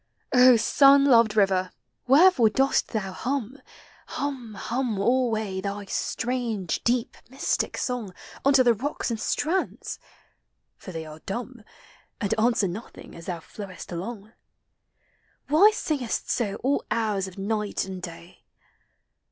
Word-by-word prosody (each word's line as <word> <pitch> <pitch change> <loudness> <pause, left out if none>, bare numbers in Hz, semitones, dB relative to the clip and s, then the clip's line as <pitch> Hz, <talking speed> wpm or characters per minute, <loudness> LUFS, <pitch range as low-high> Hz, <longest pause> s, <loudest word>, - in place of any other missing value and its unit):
O 250 -1 +7
sun 275 +4 +5
loved 230 -5 +5
river! 190 -2 +2 0.4
wherefore 275 -4 +6
dost 270 +5 +1
thou 205 -4 -3
hum. 260 +4 -3 0.5
Hum, 260 -6 -5
hum 240 0 -2
alway, 220 -4 0
iliy 200 0 -5
strange, 230 -7 -2
deep, 240 0 0
mystic 265 +2 -1
song 245 -6 -3 0.3
Unto 275 -1 +5
the 240 -1 +5
rocks 255 +3 -3
and 225 - -3
strands? 345 +11 -2 0.8
for 185 - -10
they 165 -2 -6
are 155 0 -10
dumb, 240 +4 -5 0.6
And 205 0 0
answer 225 -3 +2
nothing 200 +7 -9
as 165 - -11
thou 175 -3 -4
ilowest 190 0 -9
along. 205 +5 -6 1.2
Why 320 +9 +7
singes! 290 - -2
so 210 -5 -1
all 275 +2 +1
hours 210 -4 0
of 185 - -11
Qighl 210 +1 -2
and 190 -1 -7
day? 170 0 -10
225 Hz, 125 wpm, -25 LUFS, 195-255 Hz, 1.2 s, O